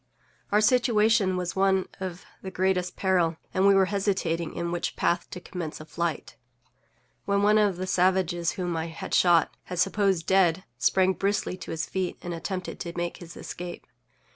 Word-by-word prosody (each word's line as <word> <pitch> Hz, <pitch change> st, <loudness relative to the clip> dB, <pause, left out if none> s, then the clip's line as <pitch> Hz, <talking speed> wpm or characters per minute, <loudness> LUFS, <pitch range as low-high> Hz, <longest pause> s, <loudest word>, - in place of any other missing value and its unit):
Our 210 Hz, +1 st, +4 dB
situation 220 Hz, -4 st, +3 dB
was 180 Hz, -1 st, -3 dB
one 190 Hz, -1 st, +2 dB
of 185 Hz, -2 st, -6 dB, 0.2 s
the 190 Hz, -, -6 dB
greatest 185 Hz, -1 st, 0 dB
peril, 175 Hz, -4 st, +1 dB, 0.2 s
and 190 Hz, +1 st, +3 dB
we 200 Hz, -, +6 dB
were 195 Hz, -1 st, +5 dB
hesitating 185 Hz, -5 st, -1 dB
in 170 Hz, 0 st, -2 dB
which 175 Hz, -, -2 dB
path 175 Hz, 0 st, 0 dB
to -, -, -7 dB
commence 175 Hz, -3 st, -6 dB
a 155 Hz, -, -9 dB
flight, 160 Hz, -7 st, -3 dB, 0.9 s
when 200 Hz, 0 st, +1 dB
one 210 Hz, +1 st, +5 dB
of 205 Hz, -4 st, +2 dB
the 185 Hz, -, -3 dB
savages 180 Hz, -2 st, +1 dB
_whom_I 170 Hz, -3 st, -3 dB
had 160 Hz, -, -7 dB
shot, 170 Hz, -3 st, +4 dB, 0.2 s
and 180 Hz, -, -4 dB
supposed 195 Hz, -4 st, +1 dB
dead, 190 Hz, -2 st, +3 dB, 0.2 s
sprang 190 Hz, 0 st, +3 dB
briskly 200 Hz, -1 st, -1 dB
to -, -, -9 dB
his 160 Hz, 0 st, -2 dB
feet, 185 Hz, -2 st, -3 dB
and 175 Hz, -, -4 dB
attempted 180 Hz, +2 st, -5 dB
to 170 Hz, -1 st, -6 dB
make 175 Hz, 0 st, -2 dB
his 170 Hz, -1 st, -11 dB
escape. 175 Hz, 0 st, -7 dB
185 Hz, 170 wpm, -27 LUFS, 170-195 Hz, 0.9 s, we